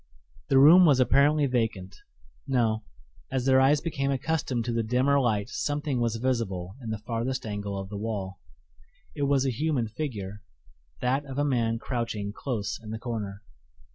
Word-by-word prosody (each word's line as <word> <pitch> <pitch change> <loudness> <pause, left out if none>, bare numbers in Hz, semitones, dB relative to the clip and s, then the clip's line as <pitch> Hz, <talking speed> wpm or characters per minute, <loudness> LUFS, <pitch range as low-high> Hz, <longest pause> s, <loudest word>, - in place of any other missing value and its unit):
The 135 - +4
room 160 +7 +8
was 140 -4 +4
apparently 140 +4 +4
vacant 115 -7 -1 0.5
no; 115 -5 +1 0.5
as 130 -1 -1
their 130 0 +5
eyes 145 +2 +4
became 140 -5 -2
accustomed 135 -3 -1
to 120 - -2
the 115 - +1
dimmer 130 +5 +2
light 110 -6 +1
something 145 -2 -2
was 115 -1 0
visible 110 -7 -2
in 115 - -6
the 110 - -2
farthest 120 +4 -3
angle 105 -2 -4
of 95 0 -6
the 100 -1 -5
wall. 100 -3 -4 0.8
It 140 -1 0
was 135 -1 +2
a 135 - +1
human 130 -2 0
figure 105 -6 -5 0.6
that 130 +3 +1
of 135 0 -7
a 145 - +2
man 115 -5 +1
crouching 115 -5 -3
close 115 -5 -3
in 110 - -10
the 110 - -4
corner. 110 -4 -5
120 Hz, 170 wpm, -27 LUFS, 110-135 Hz, 0.8 s, room